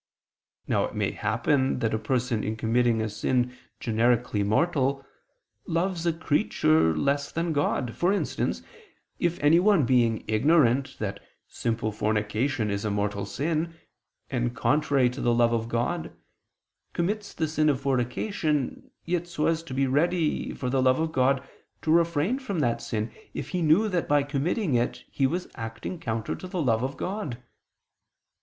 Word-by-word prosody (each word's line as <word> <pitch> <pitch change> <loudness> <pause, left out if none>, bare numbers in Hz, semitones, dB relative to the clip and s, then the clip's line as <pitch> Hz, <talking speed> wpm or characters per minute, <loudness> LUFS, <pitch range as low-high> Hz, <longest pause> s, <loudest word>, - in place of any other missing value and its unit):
Now - - +2
it - - -7
may - - 0
happen 120 +6 +1
that 115 -3 0
a 110 - 0
person 125 -2 -1
in 110 - -2
committing 115 0 +2
a - - -1
sin 125 +4 0 0.2
generically 115 -1 +1
mortal, 135 +5 +1 0.6
loves 175 +1 -1
a - - +4
creature 80 - +2
less 140 - 0
than 165 0 -1
God; 140 -4 0
for 175 +2 +2
instance, 200 - -1 0.6
if 175 -1 0
anyone 170 +2 +5
being 115 -3 +2
ignorant 135 +2 +3
that - - -4 0.3
simple 115 -1 -2
fornication 105 +3 0
is 100 0 -2
a 110 - -1
mortal 100 -1 -1
sin, 160 +7 -2 0.6
and 120 -1 -1
contrary 135 +2 +2
to 130 - -6
the 120 -1 +2
love 120 0 +3
of 115 -1 -1
God, 120 +9 -1 0.8
commits 205 +4 -2
the 160 - -1
sin 155 0 +2
of 140 -3 +1
fornication, 140 - -1 0.2
yet 175 0 -1
so 160 -3 -2
as 165 0 +1
to 165 -5 -9
be 135 0 +2
ready, 160 +4 +1
for 125 -2 -3
the 135 0 +2
love 130 +1 +3
of 160 0 0
God, 135 -1 +1 0.4
to 155 - +1
refrain 170 - +2
from 235 -9 -4
that 120 -4 0
sin 110 0 -3 0.2
if - - -4
he 180 -1 -2
knew 165 +7 +4
that 180 -5 -1
by 145 -1 +3
committing 145 - -1
it 120 0 0
he 135 - +2
was 175 +6 -3
acting 115 +9 -6
counter 115 -7 -2
to 185 - -7
the 180 -1 -4
love 115 -4 +2
of 135 +2 -3
God. 185 - -3
135 Hz, 160 wpm, -26 LUFS, 115-165 Hz, 0.8 s, anyone